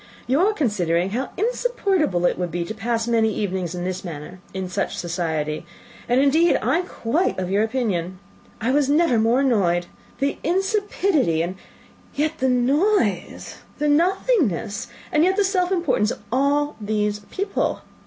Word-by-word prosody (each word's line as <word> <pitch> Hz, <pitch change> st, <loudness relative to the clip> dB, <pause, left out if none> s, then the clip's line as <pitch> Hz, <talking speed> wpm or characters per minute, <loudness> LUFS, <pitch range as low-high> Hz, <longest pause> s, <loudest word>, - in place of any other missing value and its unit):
"You 265 Hz, +4 st, +2 dB
are 395 Hz, +5 st, +4 dB
considering 190 Hz, -, 0 dB
how 255 Hz, +5 st, -2 dB
insupportable 395 Hz, -, 0 dB
it -, -, +2 dB
would 180 Hz, -1 st, -1 dB
be 170 Hz, 0 st, -3 dB
to 195 Hz, -, -5 dB
pass 225 Hz, +1 st, -2 dB
many 225 Hz, -2 st, +2 dB
evenings 185 Hz, -4 st, -2 dB
in 175 Hz, -, -4 dB
this 185 Hz, 0 st, -3 dB
manner, 170 Hz, +1 st, -8 dB
in 190 Hz, -1 st, -4 dB
such 180 Hz, -, -2 dB
society; 160 Hz, -3 st, -2 dB, 0.5 s
and, 245 Hz, +2 st, +4 dB
indeed, 310 Hz, +5 st, +4 dB
I 330 Hz, -, +1 dB
am 360 Hz, -, -4 dB
quite 300 Hz, +9 st, -1 dB
of 185 Hz, 0 st, -3 dB
your 200 Hz, +2 st, +3 dB
opinion. 205 Hz, -7 st, -1 dB, 0.4 s
I 235 Hz, +2 st, 0 dB
was 280 Hz, 0 st, +2 dB
never 295 Hz, -5 st, +3 dB
more 230 Hz, +4 st, +3 dB
annoyed! 185 Hz, -10 st, +2 dB, 0.3 s
The 275 Hz, +3 st, -1 dB
insipidity, 370 Hz, -, +1 dB
and 180 Hz, +2 st, -4 dB, 0.6 s
yet 310 Hz, +2 st, -1 dB
the 260 Hz, -, +2 dB
noise 255 Hz, -, +1 dB, 0.2 s
the 300 Hz, -, 0 dB
nothingness, 305 Hz, -, +1 dB, 0.2 s
and 305 Hz, -2 st, +3 dB
yet 375 Hz, +2 st, +3 dB
the 410 Hz, -, +3 dB
self 375 Hz, -2 st, +1 dB
importance, 295 Hz, -, +1 dB
of -, -, -6 dB
all 285 Hz, +3 st, +1 dB
these 210 Hz, 0 st, -1 dB
people! 395 Hz, +2 st, -2 dB
240 Hz, 160 wpm, -22 LUFS, -, 0.6 s, are